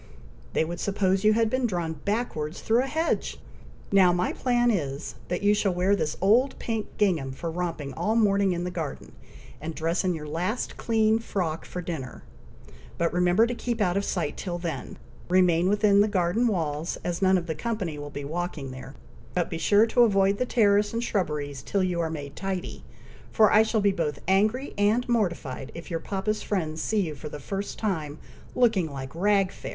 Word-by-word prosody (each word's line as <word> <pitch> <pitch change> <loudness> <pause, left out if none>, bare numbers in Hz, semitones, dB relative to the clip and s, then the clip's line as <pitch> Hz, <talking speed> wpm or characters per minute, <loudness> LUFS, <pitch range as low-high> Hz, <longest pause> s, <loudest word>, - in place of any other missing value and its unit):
They - - +2
would 170 +1 -5
suppose 195 -1 +1
you 215 0 +5
had 225 +1 +3
been 255 +2 0
drawn 175 -5 -2
backwards 165 -3 -3
through 230 +2 +3
a 265 - -2
hedge! 320 +4 -1 0.5
Now 190 -3 +6
my 180 +1 0
plan 240 -1 +2
is, 145 -6 -3
that 180 +3 -2
you 205 0 +5
shall 200 -3 +1
wear 185 +3 +3
this 155 -5 -2
old 235 +8 +3
pink 225 -3 -3
gingham 170 -10 +1
for 165 +5 -4
romping 165 -5 -3
all 215 - 0
morning 200 -3 +3
in 175 0 -2
the 180 - -3
garden, 160 -5 -5 0.5
and 160 +1 -5
dress 165 +3 0
in 180 -2 +1
your 150 -1 -7
last 180 +10 -2
clean 220 -1 +2
frock 175 -8 -3
for 180 - -6
dinner; 155 -7 -6 0.7
but 170 0 0
remember 180 +5 +4
to 240 - -2
keep 240 -1 -3
out 180 -4 +2
of 200 - +1
sight 170 -7 -2
till 175 -2 -3
then. 165 -6 -5 0.3
Remain 180 -1 +4
within 205 -1 +4
the 210 - +4
garden 205 +4 +1
walls, 160 -6 -1
as 175 +1 -3
none 190 0 +5
of 175 - -3
the 160 - -2
company 195 -8 -3
will 145 0 -6
be 145 0 -6
walking 160 -3 -4
there, 130 +1 -9 0.4
but 175 -1 0
be 165 - -3
sure 205 +6 +5
to 245 +2 +2
avoid 195 -3 +4
the 250 - 0
terrace 205 -3 +3
and 230 +1 -1
shrubberies 150 - -2
till 200 -2 0
you 180 -2 0
are 165 - -1
made 145 -3 -6
tidy, 190 -2 -4 0.5
for 215 -2 +5
I 215 - +7
shall 220 0 +1
be 200 0 +4
both 155 -6 -2
angry 215 +8 +2
and 215 +4 +2
mortified 170 - -1
if 170 +2 -9
your 165 - -1
papa's 200 +4 -2
friends 160 -6 -2
see 215 -1 +1
you 165 -5 -2
for 150 +1 -8
the 150 - -7
first 195 +8 -5
time 160 -9 -2 0.4
looking 220 -10 +2
like 135 -1 -7
rag 195 +2 +2
fair." - - -8
185 Hz, 200 wpm, -26 LUFS, 160-210 Hz, 0.7 s, I